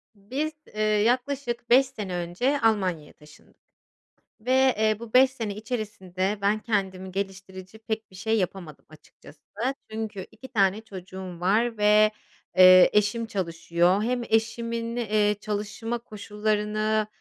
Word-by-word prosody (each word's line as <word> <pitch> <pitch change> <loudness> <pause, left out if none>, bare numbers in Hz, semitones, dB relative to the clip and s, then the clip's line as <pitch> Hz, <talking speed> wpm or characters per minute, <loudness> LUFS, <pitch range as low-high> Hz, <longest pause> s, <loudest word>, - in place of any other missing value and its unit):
Biz, 260 +10 -3 0.2
eee, 215 - -2
yaklaşık 240 +4 0
5 260 +3 +6
sene 200 -7 -6
önce 180 +12 -1
Almanya'ya 185 -9 0
taşındık 150 0 -20 0.8
ve, 245 +4 -3 0.3
eee, 215 0 +2
bu 235 -1 -10
5 260 +1 +6
sene 225 -6 -5
içerisinde 210 -4 -3
ben 205 +2 +2
kendimi 190 -4 -2
geliştirici 190 0 -6
pek 220 -1 -5
bir - - -15
şey 220 +4 0
yapamadım 180 -5 -4
açıkçası. 155 -1 -17 0.5
Çünkü 215 -3 -5
2 260 - -12
tane 205 -4 +1
çocuğum 185 -3 -9
var 220 +6 +1
ve, 210 +1 +5 0.5
eee, 185 0 +9
eşim 210 +3 +1
çalışıyor. 175 0 0
Hem 245 +2 -1
eşimin, 230 +1 -1
eee, 210 -3 +1
çalışma 215 +3 -3
koşullarını, 215 0 -1
210 Hz, 125 wpm, -26 LUFS, 190-225 Hz, 0.8 s, eee